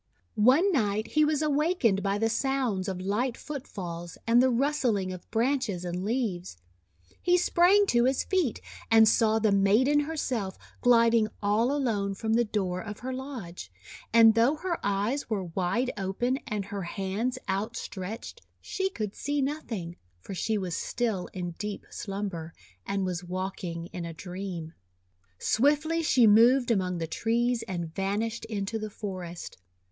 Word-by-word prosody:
One 265 - +4
night 215 - 0
he 305 - +3
was 300 0 +1
awakened 295 - +2
by 200 0 0
the 225 +2 +1
sounds 235 -5 0
of 190 -2 -3
light 215 +7 -1
footfalls 175 - -7
and 235 +1 +5
the 260 - +4
rustling 240 -7 +1
of 180 - -11
branches 230 -6 0
and 175 +1 -3
leaves. 205 - -2 0.6
He 355 0 +4
sprang 360 +3 +4
to 240 0 +4
his 265 +1 +1
feet, 365 - 0 0.3
and 225 -1 +7
saw 220 0 +4
the 220 -1 +2
maiden 215 +9 +4
herself 260 -10 -2 0.2
gliding 230 -2 +5 0.2
all 215 +5 +2
alone 215 -9 0
from 220 +2 -1
the 235 +1 +4
door 190 -5 -2
of 210 +1 -8
her 260 +1 -4
lodge. 230 - -7 0.4
And 225 -1 +7
though 235 +7 +3
her 340 +2 -3
eyes 205 +8 -1
were 205 -4 -1
wide 185 +9 -1
open 210 +7 -1
and 210 -2 -2
her 200 -1 -5
hands 195 +7 -2
outstretched, 215 - -4 0.2
she 385 -1 -2
could 215 - -4
see 290 +1 -2
noth 285 +1 -2
ing, 175 -5 -4 0.2
for 90 - -8
she 215 +4 -1
was 185 -4 -3
still 220 -7 -2
in 180 -2 -4
deep 210 -1 -5
slumber, 195 -5 -5 0.3
and 195 -1 -1
was 180 -1 -3
walking 180 -2 -4
in 175 - -4
a 165 -1 -7
dream. 180 -3 -6 0.6
Swiftly 300 - +2
she 260 -6 +4
moved 240 +4 +6
among 185 -4 0
the 165 - -2
trees 230 +7 0
and 170 -3 -4
van 195 +3 -1
ished 230 +1 -4
into 215 0 -3
the 215 0 -4
forest. 185 - -7
220 Hz, 155 wpm, -28 LUFS, 190-255 Hz, 0.6 s, and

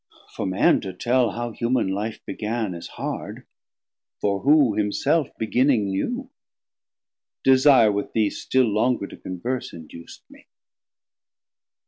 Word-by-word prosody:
For - - -3
Man 95 +1 +3
to 95 -2 -6
tell 120 +5 +1
how 120 +1 -4
human 120 -2 0
Life 105 +3 -4
began 110 -1 -3
250 85 - -6
Is - - -9
hard; - - -6 0.7
for 100 -1 0
who 140 -3 +4
himself 110 +9 +1
beginning 110 -2 +1
knew? 245 - -3 1.1
Desire 130 -4 +6
with 100 0 -3
thee 110 -2 +1
still 130 -1 +1
longer 110 +1 +1
to - - -11
converse 120 +8 -5
Induc'd 85 +1 -12
me. - - -19
110 Hz, 125 wpm, -23 LUFS, 100-130 Hz, 1.1 s, Desire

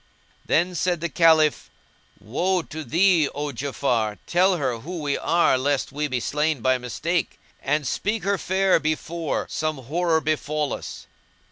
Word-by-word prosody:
Then 175 +3 +1
said 175 0 0
the 170 +1 -2
Caliph, 160 -1 +3 0.5
"Woe 175 - -1
to 155 0 -7
thee, 165 +2 +3
O 145 0 -3
Ja'afar, 120 -5 -1
tell 185 +1 +3
her 130 -6 -2
who 175 +9 -7
we 145 -2 -1
are 170 -6 +2
lest 140 +1 0
we 150 +2 -2
be 130 -3 -1
slain 150 +2 -1
by 130 +1 +2
mistake; 125 - -2 0.2
and 150 +2 0
speak 210 - -1
her 200 -1 0
fair 190 0 +2
before 155 +1 -2
some 155 -1 -2
horror 160 +6 0
befal 150 -1 -1
us." - - -7
155 Hz, 150 wpm, -24 LUFS, 140-175 Hz, 0.5 s, Caliph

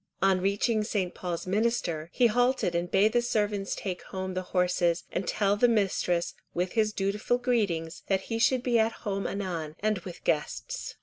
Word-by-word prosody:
On 190 -1 +3
reaching 205 +3 +1
St. 190 -4 -1
Paul's 175 -2 -4
Minster, 185 -6 0
he 250 - +3
halted 245 -4 +2
and 170 +1 -1
bade 210 +4 +3
the 240 - +4
servants 210 -4 -1
take 185 -3 -4
home 190 0 -4
the 185 - -1
horses, 180 -2 +1
and 180 - -2
tell 200 -1 +2
the 245 +4 +4
mistress, 195 -6 +1 0.2
with 180 +1 0
his 215 -1 +2
dutiful 210 +4 0
greetings, 200 -10 -1
that 190 -1 +1
he 225 +3 -3
should 250 +1 +3
be 240 -2 +3
at 220 +1 +3
home 195 -1 -1
anon, 170 -6 -4
and 215 -1 +1
with 180 -1 -10
guests. 150 -1 -2
195 Hz, 180 wpm, -28 LUFS, 180-220 Hz, 0.2 s, the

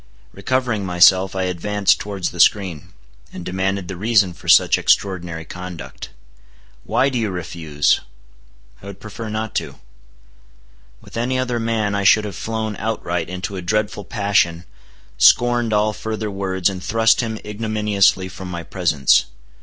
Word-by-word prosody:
Recovering 125 -5 -1
myself, 95 +1 +4
I 95 - -1
advanced 100 +3 +1
towards 100 -3 -4
the 85 - -10
screen, 90 -4 +2 0.4
and 90 - -8
demanded 95 0 -2
the 95 - -6
reason 100 -1 +2
for - - -15
such - - +5
extraordinary 85 -4 0
conduct. 90 -1 -8 0.7
"Why 135 - +1
do 125 -3 -2
you 110 -2 -1
refuse?" 80 -5 0 0.8
"I 100 - -11
would 100 -2 -9
prefer 110 +1 -8
not 110 0 -4
to." - - -4 1.3
With - - -11
any 125 +2 0
other 125 -2 -1
man 115 -3 -1
I 100 0 -1
should 105 +2 +5
have 100 -4 -6
flown 110 -1 -3
outright 90 -6 -3
into 90 +2 -5
a 95 - -4
dreadful 105 +3 -1
passion, 100 -6 0 0.5
scorned 120 -1 +4
all 105 0 +2
further 110 0 -4
words, 95 -2 -1
and 95 -2 -3
thrust 115 +1 +3
him 110 -2 -4
ignominiously 105 -3 +1
from 95 0 -9
my 85 -1 -5
presence. 80 -6 +2
100 Hz, 145 wpm, -20 LUFS, 90-110 Hz, 1.3 s, such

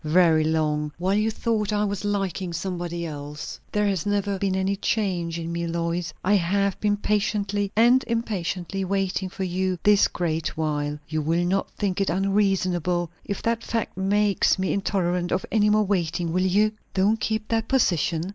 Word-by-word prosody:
"Very 160 0 +4
long! 150 -1 0
while 185 +2 0
you 215 +2 +2
thought 220 -2 -1
I 210 0 +1
was 200 -1 -3
liking 195 -3 -2
somebody 175 -1 -3
else. 150 -1 -7
There 210 0 +1
has 195 -5 0
never 200 -1 0
been 195 -1 0
any 190 +1 0
change 185 -5 -1
in 165 0 -4
me, 170 0 -2
Lois. 170 +1 -2
I 200 - +3
have 200 +2 0
been 205 -1 +1
patiently 205 -1 0
and 240 +4 +5
impatiently 195 -5 -2
waiting 190 0 -1
for 190 - -5
you 185 0 -1
this 205 -1 +5
great 165 -3 -2
while. 150 -2 -1
You 155 0 -1
will 165 +3 +1
not 190 +2 0
think 200 -1 -1
it 195 - +1
unreasonable, 185 -2 +1
if 200 - -4
that 230 0 0
fact 230 -2 -2
makes 200 +1 +2
me 190 0 0
intolerant 180 -3 0
of 185 - 0
any 210 -1 +3
more 215 0 +4
waiting, 170 -3 -1
will 185 +1 +2
you?" 210 +3 +3 0.2
"Don't 205 +4 +3
keep 220 0 -2
that 225 -1 0
position!" 175 - +1
190 Hz, 175 wpm, -25 LUFS, 170-205 Hz, 0.2 s, and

